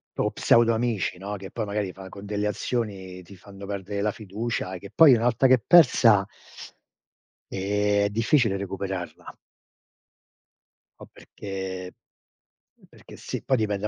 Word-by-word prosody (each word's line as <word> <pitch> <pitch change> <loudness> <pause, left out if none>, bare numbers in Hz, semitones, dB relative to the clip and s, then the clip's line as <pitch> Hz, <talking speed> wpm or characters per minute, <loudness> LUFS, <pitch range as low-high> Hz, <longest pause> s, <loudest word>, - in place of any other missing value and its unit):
o - - 0
pseudo 115 0 +3
amici, 110 -6 -1
no, 100 +3 -6
che 95 -1 -9
poi 115 - -3
magari 100 -2 -3
fa 95 0 -11
con 100 +1 -11
delle 105 0 -2
azioni 100 -4 -4
ti 95 +3 -14
fanno 100 +1 -12
perdere 100 0 -5
la 105 +1 0
fiducia, 105 -2 -4
che 100 +2 -11
poi 160 -5 +8
una 115 -1 +1
volta 120 +2 +2
che 130 - +6
è - - -4
persa 120 - +6 1.3
eh 100 +1 +1
è - - 0
difficile 115 0 +2
recuperarla. 95 -2 -6 1.6
Po' - - -12
perché 95 -2 -7 1.0
perché - - -15
sì, - - -6
poi 130 - +1
dipende 105 -2 -1
100 Hz, 145 wpm, -25 LUFS, 95-115 Hz, 1.6 s, poi